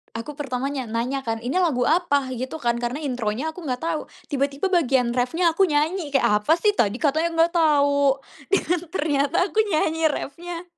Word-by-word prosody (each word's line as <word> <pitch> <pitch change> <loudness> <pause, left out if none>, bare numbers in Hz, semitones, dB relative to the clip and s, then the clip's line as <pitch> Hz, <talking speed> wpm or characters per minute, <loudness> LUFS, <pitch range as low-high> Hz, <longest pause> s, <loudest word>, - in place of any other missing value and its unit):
aku 275 +6 -6
pertamanya 270 -1 -3
nanya 245 +4 -2
kan, 225 0 -2
"Ini 260 +9 -1
lagu 305 -9 +2
apa?" 285 -6 +2
gitu 260 +5 -5
kan, 235 0 +1
karena 245 +5 -3
intronya 250 +2 -2
aku 335 0 -10
nggak 250 0 -3
tahu 330 -2 -1 0.3
tiba-tiba 280 +6 -1
bagian 265 -8 +2
reffnya 290 +8 +1
aku 385 +4 +3
nyanyi, 305 +1 0
kayak 210 -6 +3
"Apa 300 +10 +2
sih 415 +4 +2
tadi 205 -1 +2
katanya 320 +3 +1
nggak 330 +1 +3
tahu," 285 -3 +3 0.4
dan 355 -2 +2
ternyata 290 -2 0
aku 435 - -1
nyanyi 320 -2 +1
reffnya 335 +4 -5
285 Hz, 175 wpm, -23 LUFS, 255-330 Hz, 0.4 s, aku